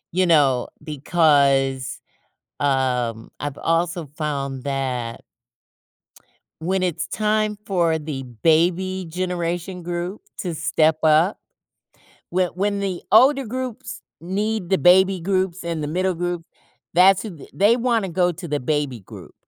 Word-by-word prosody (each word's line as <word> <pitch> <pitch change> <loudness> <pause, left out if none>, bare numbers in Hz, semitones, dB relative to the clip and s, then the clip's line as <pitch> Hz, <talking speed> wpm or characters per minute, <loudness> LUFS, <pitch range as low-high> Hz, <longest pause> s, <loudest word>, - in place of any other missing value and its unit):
You 185 -1 +3
know, 140 -6 +3 0.2
because, 140 -4 +2 0.6
um, 125 -5 0
I've 145 -1 -4
also 165 0 0
found 140 -3 -4
that 130 -4 -3 1.4
when 185 +3 0
it's 180 -4 -1
time 215 -1 0
for 170 -4 +1
the 145 -3 -5 0.2
baby 180 +3 +2
generation 180 0 -3
group 175 +3 -4 0.2
to 180 -4 -3
step 155 0 +2
up, 160 +5 +4 0.9
whe 180 0 +1
when 200 +2 0
the 190 -3 -3
older 265 +4 +6
groups 255 0 -5 0.2
need 200 +2 -2
the 190 - +3
baby 185 +1 +5
groups 185 -1 -1
and 165 -2 -3
the 150 - -2
middle 185 +3 0
group, 175 -1 -3 0.5
that's 185 +2 +6
who 175 -10 -9
they 210 +5 +4
wanna 230 -5 0
go 180 +1 +2
to 170 +1 -8
the 145 -1 -1
baby 145 -2 -1
group. 95 - -13
175 Hz, 125 wpm, -22 LUFS, 145-190 Hz, 1.4 s, older